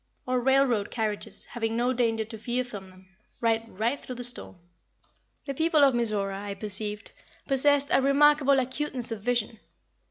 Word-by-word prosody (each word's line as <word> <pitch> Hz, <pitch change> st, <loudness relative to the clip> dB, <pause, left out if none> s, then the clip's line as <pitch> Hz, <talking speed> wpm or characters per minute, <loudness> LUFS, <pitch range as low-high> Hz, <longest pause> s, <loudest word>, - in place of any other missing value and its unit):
Our 255 Hz, 0 st, +1 dB
railroad 255 Hz, -4 st, +2 dB
carriages, 215 Hz, -3 st, -3 dB
having 225 Hz, -1 st, -3 dB
no 245 Hz, +2 st, +1 dB
danger 225 Hz, -3 st, 0 dB
to 220 Hz, +1 st, -8 dB
fear 245 Hz, +3 st, -1 dB
from 205 Hz, -6 st, -9 dB
them, 185 Hz, 0 st, -19 dB, 0.3 s
ride 230 Hz, 0 st, 0 dB
right 230 Hz, +8 st, -1 dB
through 255 Hz, -, -8 dB
the 245 Hz, -, -6 dB
storm." 245 Hz, -4 st, -4 dB, 0.9 s
The 275 Hz, -, -3 dB
people 320 Hz, +1 st, +3 dB
of 275 Hz, -2 st, +5 dB
Mizora, 205 Hz, -5 st, -1 dB
I 200 Hz, -1 st, -5 dB
perceived, 210 Hz, +1 st, -2 dB, 0.4 s
possessed 285 Hz, +1 st, +4 dB
a 270 Hz, -, +4 dB
remarkable 280 Hz, 0 st, +4 dB
acuteness 260 Hz, -1 st, -2 dB
of 220 Hz, -3 st, -5 dB
vision. 230 Hz, -1 st, -1 dB
240 Hz, 160 wpm, -27 LUFS, 215-270 Hz, 0.9 s, of